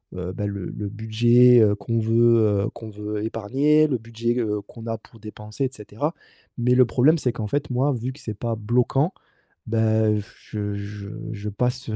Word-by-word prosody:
heu 90 0 -4
bah, 105 +3 -3
le 100 -2 -5
le 105 -1 -5
budget, 120 +3 +5
heu, 105 -1 +4
qu'on 115 +3 -2
veut, 115 +1 +4 0.3
heu, - - -2
qu'on 115 -2 -9
veut 105 0 -5
épargner, 140 +8 +2
le 130 - 0
budget, 115 +1 -3
heu, 105 -3 -1
qu'on 115 +3 -12
a 115 - -2
pour 115 - -19
dépenser 105 +4 -5
et - - -1
cetera. 110 +9 -4 0.5
Mais 125 +1 +3
le 130 0 +6
problème 135 +7 +3
c'est 125 -5 -1
qu'en 110 -3 -4
fait 145 +6 -2
moi 130 +4 +2
vu 125 +2 -4
que 140 - -15
c'est 110 - -5
pas 115 +2 -3
bloquant, 125 - +1 0.6
bah 110 -1 +2
heu, 105 0 +1 0.3
je 105 -1 -3
je 100 0 -7 0.2
je 105 0 -5
passe, 125 +4 -2
heu, 110 - -2
115 Hz, 200 wpm, -23 LUFS, 105-125 Hz, 0.6 s, le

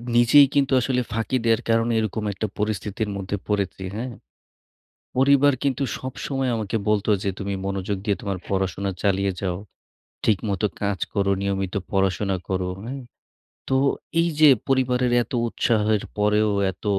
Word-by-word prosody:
নিজেই 120 +4 +7
কিন্তু 140 -1 +2
আসলে 125 +1 +1
ফাঁকি 115 +4 0
দেওয়ার 115 0 +3
কারণে 115 +1 +2
এরকম 110 0 -2
একটা 110 +3 -3
পরিস্থিতির 105 0 -2
মধ্যে 95 +1 -3
পড়েছি, 100 -2 -1
হ্যা। 115 +4 -3 1.1
পরিবার 140 +2 +5
কিন্তু 140 0 0 0.2
সবসময় 130 0 -3
আমাকে 110 0 -2
বলত 105 -1 +1 0.2
যে 100 - 0
তুমি 100 -1 -3
মনোযোগ 100 0 -2
দিয়ে 105 -2 +1
তোমার 100 -2 -3
পড়াশোনা 95 0 -1
চালিয়ে 100 -1 +1
যাও। 90 -2 -2 0.7
ঠিকমত 100 -1 0 0.2
কাজ 100 -2 0 0.2
করো, 100 -2 +1
নিয়মিত 95 -1 -2 0.2
পড়াশোনা 95 0 +1
করো, 95 -1 -1
হ্যা। 120 +4 -6 0.8
তো 135 - +2 0.4
এই 170 - +2
যে 155 - +9 0.2
পরিবারের 125 -2 +2
এত 110 - -11 0.2
উৎসাহের 110 -3 +1 0.2
পরেও 105 +1 +3 0.2
এত 95 - -22
105 Hz, 140 wpm, -23 LUFS, 100-120 Hz, 1.1 s, যে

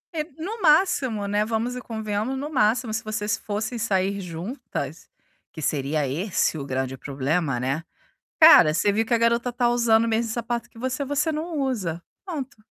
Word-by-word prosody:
É, 305 - 0 0.2
no 420 +7 -5
máximo, 300 - +3
né, 205 +1 +1
vamos 225 +3 -2
e 250 - -5
convenhamos, 220 +3 -3
no 285 - -4
máximo, 235 -4 +1
se 220 - -2
vocês 215 -1 -1
fossem 220 +3 -4
sair 200 -2 0
juntas, 180 - -6 0.4
que - - -10
seria 145 0 0
esse 170 +5 0
o 145 - -4
grande 130 -1 -2
problema, 140 +1 -1
né. 135 +6 -2 0.6
Cara, 310 - +9
você 200 +6 +2
viu 220 +2 +1
que 225 - -5
a 235 - +4
garota 235 +1 +1
tá 240 0 +1
usando 235 -2 +3
o 230 - -1
mesmo 225 +1 0
sapato 235 0 -3
que 225 - -16
você, 260 +3 -2
você 290 +3 0
não 315 +1 -3
usa. 205 - -2 0.2
Ponto. 280 -7 -5
220 Hz, 180 wpm, -24 LUFS, 180-255 Hz, 0.6 s, Cara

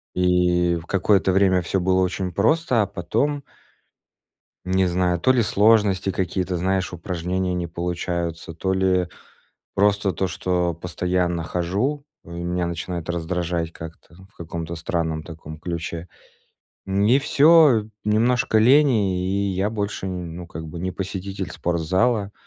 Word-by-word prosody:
и 90 -1 +2
в 85 -1 -6
какое-то 95 0 +2
время 95 -1 +3
всё 90 +3 -1
было 95 +1 +2
очень 95 0 -1
просто, 120 - +2
а - - -1
потом 115 - -1 1.2
не 95 0 +2
знаю, 90 0 +1
то 130 - +4
ли 125 -2 +3
сложности, 100 -3 +3
какие-то, 90 0 -2
знаешь, 95 +1 0
упражнения 90 +1 -2
не 90 -1 -2
получаются, 85 -1 -3
то 95 +4 -1
ли 95 -1 +2 0.7
просто 100 0 +2
то, 95 +4 -1
что 90 -1 -1
постоянно 90 0 -1
хожу, 100 - -1 0.2
меня 85 +1 -3
начинает 85 0 -5
раздражать 85 -1 -2
как-то, 80 0 -11 0.2
в - - -35
каком-то 85 0 -5
странном 80 -1 -2
таком 80 -2 -10
ключе. 85 0 -5 0.8
Н 95 +1 +1
и 120 +6 +5
всё, 145 -5 +5 0.2
немножко 110 +2 +2
лени, 115 -7 +4
и 100 +2 0
я 95 +3 -1
больше, 105 -3 -3
ну, 90 -2 -6
как 80 -1 -8
бы 85 +2 -7
не 95 +1 -2
посетитель 95 0 -5
спортзала. 95 +6 0
90 Hz, 135 wpm, -23 LUFS, 85-100 Hz, 1.2 s, и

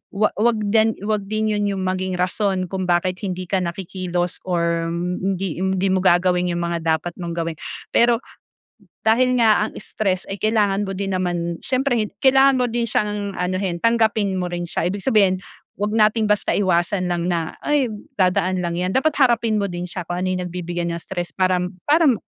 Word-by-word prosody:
huwag 210 +1 +2
huwag 225 -1 +2
din 220 0 +3
huwag 210 -2 -1
din 215 0 0
'yon 205 -1 0 0.2
maging 185 0 -1
rason 185 0 -1
kung 190 -1 -2
bakit 180 +1 +1
hindi 185 -3 -4
ka 185 +1 0
na 170 -1 -3
kikilos 180 -1 -3
or 170 -2 0 0.3
hindi 190 -3 -2
hindi 190 0 0
mo 190 - +2
gagawin 180 0 +3
'yung 175 - -2
mga 170 0 -1 0.2
dapat 170 +2 -5
mong 170 -1 -4
gawin. 165 -2 -3 0.3
Pero, 235 0 +3 0.8
dahil 250 +3 +3
nga 215 -2 +4
ang - - -5
stress 195 -4 -2
ay 195 - -4
kailangan 205 -2 +1
mo 195 - -4
din 195 0 -2
naman, 175 -2 -2
siyempre 250 -5 0
kailangan 270 0 +5
mo 245 - +2
din 235 0 -1
siyang 210 -2 -1
anuhin 180 -1 -1
tanggapin 220 -4 +2
mo 180 -1 -3
rin 175 -1 -3
siya - - -2
ibig 195 +3 -1
sabihin, 195 -5 +3 0.4
'wag 210 +1 -1
nating 215 0 +3
basta 210 0 +1
iwasan 180 -1 +1
lang 175 -1 -1
na, 165 -2 -2
ay 290 -4 +2 0.3
dadaan 185 0 +2
lang 170 -1 -2
'yan, 180 +1 -1
dapat 300 +3 +1
harapin 235 -5 +3
mo 200 - 0
din 175 +1 -5
siya 180 0 -5
kung 175 +1 -4
ano 185 - -1
'yung 185 -1 -1
nagbibigay 175 -1 -4
ng 170 0 -3
stress 175 0 -5
parang 185 -1 0 0.2
parang 295 -6 +4
190 Hz, 185 wpm, -21 LUFS, 180-215 Hz, 0.8 s, kailangan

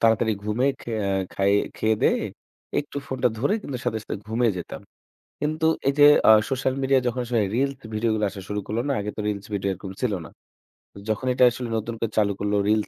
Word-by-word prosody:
তাড়াতাড়ি 115 0 +3
ঘুমে 105 +5 0
খে - - -7 0.2
আ - - 0 0.2
খায় 100 +1 +2 0.2
খেয়েদেয়ে, 110 -1 +2 0.6
একটু 145 0 -5
ফোনটা 130 -2 +1
ধরে 140 - +2
কিন্তু 135 - -5
সাথে 110 - 0
সাথে - - -4
ঘুমিয়ে 115 +1 +1
যেতাম। 90 - -7 0.6
কিন্তু 155 +2 0 0.2
এই 140 - +4
যে 145 - +9 0.2
আ - - +11 0.2
social 130 -1 0
media 135 0 +3
যখন 120 +1 -1
আসলে 120 -2 +1
reels 135 +2 +1 0.2
ভিডিওগুলো 110 0 0
আসা 95 0 -9
শুরু 105 0 -2
করলো 110 +3 -1
না, 140 - +1
আগে 105 +1 -3
তো - - -7
reels 100 -1 -3
ভিডিও 100 -1 -1
এরকম 95 +1 -8
ছিল 125 -5 +1
না। - - -10 0.8
যখন 110 +4 -1
এটা 125 - +3
আসলে 125 +1 -5
নতুন 110 +2 -3
করে 115 - -1
চালু 105 -2 +3
করলো 105 0 0
reels 105 0 +2
110 Hz, 200 wpm, -24 LUFS, 105-130 Hz, 0.8 s, আ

